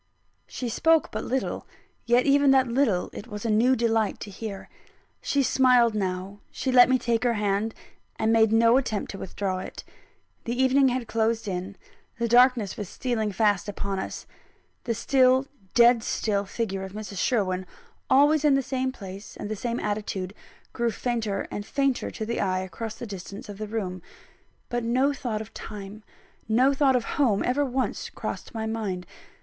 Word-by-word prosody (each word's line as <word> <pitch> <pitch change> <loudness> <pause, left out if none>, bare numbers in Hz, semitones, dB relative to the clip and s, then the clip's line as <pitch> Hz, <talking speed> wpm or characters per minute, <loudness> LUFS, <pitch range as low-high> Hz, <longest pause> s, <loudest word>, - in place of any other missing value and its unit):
She 250 - -5
spoke 325 +7 +2
but - - -4
little; 265 +1 -2 0.4
yet 240 +1 +4
even 280 0 +4
that 265 -1 +5
little 235 -7 +1
it 215 - -8
was 210 -1 -7
a 225 - +1
new 240 +5 +4
delight 225 -3 +1
to 205 - -7
hear. 200 0 -7 0.5
She 280 -1 +1
smiled 250 -3 +4
now; 190 0 -3
she 260 - -2
let 250 -1 +7
me 260 - +4
take 235 -1 0
her 240 -2 +2
hand, 210 +1 0 0.4
and 220 +1 +2
made 220 -1 +4
no 230 +2 +5
attempt 220 -6 -2
to 195 - -8
withdraw 190 0 -3
it. 185 - -8 0.6
The 235 +2 -3
evening 265 +1 +4
had 250 -2 -1
closed 225 0 0
in; 190 +1 -4 0.4
the 235 0 0
darkness 240 -4 +4
was 205 -4 -5
stealing 225 -4 -2
fast 205 -1 +1
upon 200 -1 -3
us; - - -6 0.6
the 230 - -1
still, 260 +2 +3 0.3
dead 235 -1 +6
still 205 -2 -1
figure 195 -2 -3
of 190 0 -8
Mrs. 210 -2 -6
Sherwin, 185 -6 0 0.4
always 290 +3 +5
in 295 -2 +5
the 275 - +1
same 260 0 -1
place 195 -3 -10
and 205 - -6
the - - -1
same 235 +3 -3
attitude, 205 -3 -3 0.4
grew 235 0 0
fainter 225 -4 -2
and 205 - -4
fainter 275 +3 0
to 220 - -5
the 235 +2 -2
eye, 185 -2 0
across 215 +4 -6
the 240 - -7
distance 200 0 -8
of 205 0 -8
the 215 - -4
room 190 -4 -4 0.7
but 240 0 -2
no 255 +5 +2
thought 235 -6 -3
of 220 0 -10
time, 205 0 -8 0.5
no 255 +5 +4
thought 270 -1 +3
of 245 - +1 0.2
home 220 -8 +3
ever 270 +4 +1
once 260 -1 -2
crossed - - -6
my 220 0 -2
mind. 210 -5 -3
225 Hz, 175 wpm, -26 LUFS, 205-255 Hz, 0.7 s, let